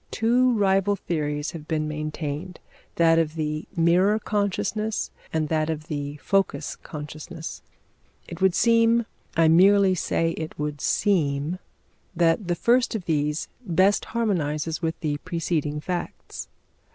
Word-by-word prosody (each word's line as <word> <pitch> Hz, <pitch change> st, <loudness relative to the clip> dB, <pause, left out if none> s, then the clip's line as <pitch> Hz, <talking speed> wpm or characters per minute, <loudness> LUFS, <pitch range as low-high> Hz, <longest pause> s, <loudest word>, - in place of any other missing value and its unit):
Two 245 Hz, +3 st, +3 dB
rival 195 Hz, 0 st, +3 dB
theories 150 Hz, -5 st, -2 dB
have 155 Hz, -2 st, -9 dB
been 155 Hz, -2 st, -1 dB
maintained: 155 Hz, +3 st, -4 dB, 0.4 s
that 165 Hz, -1 st, +4 dB
of 160 Hz, -1 st, -1 dB
the 155 Hz, -1 st, -3 dB
mirror 180 Hz, +5 st, +4 dB
consciousness 210 Hz, +1 st, -1 dB, 0.2 s
and 160 Hz, -1 st, 0 dB
that 155 Hz, -1 st, +1 dB
of 155 Hz, -1 st, -4 dB
the 145 Hz, -1 st, -4 dB
focus 195 Hz, +5 st, 0 dB
consciousness. 155 Hz, +2 st, -8 dB, 0.7 s
It 170 Hz, +1 st, -9 dB
would 190 Hz, -2 st, +4 dB
seem 230 Hz, 0 st, +4 dB, 0.3 s
I 165 Hz, -1 st, +5 dB
merely 190 Hz, +4 st, +6 dB
say 165 Hz, -1 st, 0 dB
it 160 Hz, -1 st, -6 dB
would 150 Hz, -1 st, -3 dB
seem 160 Hz, -4 st, +1 dB, 0.6 s
that 170 Hz, +3 st, +2 dB
the 175 Hz, -, +1 dB
first 240 Hz, +6 st, +2 dB
of 195 Hz, -5 st, -4 dB
these 150 Hz, -1 st, 0 dB, 0.2 s
best 190 Hz, +1 st, +2 dB
harmonises 165 Hz, -9 st, -1 dB
with 165 Hz, 0 st, -2 dB
the 150 Hz, -3 st, -1 dB
preceding 155 Hz, -2 st, -2 dB
facts. 175 Hz, +3 st, -5 dB
165 Hz, 130 wpm, -25 LUFS, 155-195 Hz, 0.7 s, merely